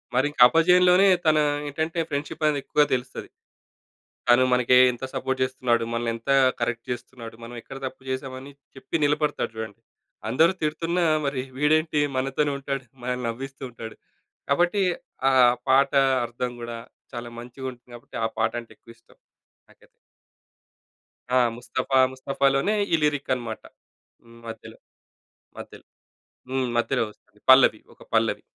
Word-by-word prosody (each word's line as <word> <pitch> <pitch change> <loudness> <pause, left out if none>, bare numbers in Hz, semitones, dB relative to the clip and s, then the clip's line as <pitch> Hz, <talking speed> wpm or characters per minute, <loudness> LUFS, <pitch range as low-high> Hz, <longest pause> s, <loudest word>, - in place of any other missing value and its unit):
మరింక 145 +3 +1
అపజయంలోనే 180 +5 +5 0.2
తన 155 -1 +4 0.3
ఏంటంటే 160 +4 -3
ఫ్రెండ్‌షిపనేది 145 0 -1
ఎక్కువగా 150 0 +2
తెలుస్తది. 125 0 -4 1.0
తను 120 +1 +6
మనకి 125 0 +3 0.2
ఎంత 120 +2 -10
సపోర్ట్ 130 0 -2
చేస్తున్నాడు? 125 -2 0
మనల్ని 115 0 -1
ఎంత 115 +4 -10 0.3
కరెక్ట్ 115 -1 -2
చేస్తున్నాడు? 120 -2 -8
మనం 120 +1 -9
ఎక్కడ 135 - -10
తప్పు 130 0 -7
చేసామని 130 +1 -5 0.2
చెప్పి 150 +4 -4
నిలబడతాడు 150 -5 0
చూడండి. 110 -2 -7 0.5
అందరూ 160 +9 +4
తిడుతున్నా 165 +3 -1 0.2
మరి 140 -2 -1 0.2
వీడేంటి? 155 +1 +2 0.2
మనతోనే 135 +2 0
ఉంటాడు. 135 -1 -4 0.2
మనల్ని 125 0 -3
నవ్విస్తూ 135 +4 -7
ఉంటాడు. 115 -1 -9 0.5
కాబట్టి 175 +7 +2 0.5
ఆహ్, 125 -2 +5
పాట 135 +1 +4 0.3
అర్థం 120 +1 -4
గూడా 120 0 -6 0.4
చాలా 120 -1 -6
మంచిగుంటుంది. 125 0 -9
కాబట్టి 120 - -10
ఆ - - +2
పాటంటే 115 +1 -2
ఎక్కువిష్టం 115 0 -19 0.5
నాకైతే. - - -23 1.4
ఆ! 130 - +3 0.2
ముస్తఫా‌ 130 +2 -1
ముస్తఫా‌లోనే 135 +7 0 0.2
ఈ 165 - +6
లిరిక్ 145 -2 0
అనమాట. 115 -3 -6 0.6
హ్మ్. 115 0 -17
మధ్యలో. 115 - -10 0.8
మధ్యలో. - - -11 0.7
హ్మ్. 130 -1 -1
మధ్యలో 125 +1 +1
వస్తుంది. 105 0 -23
పల్లవి. 130 0 +7
ఒక - - -26
పల్లవి. - - +1
130 Hz, 125 wpm, -24 LUFS, 120-145 Hz, 1.4 s, పల్లవి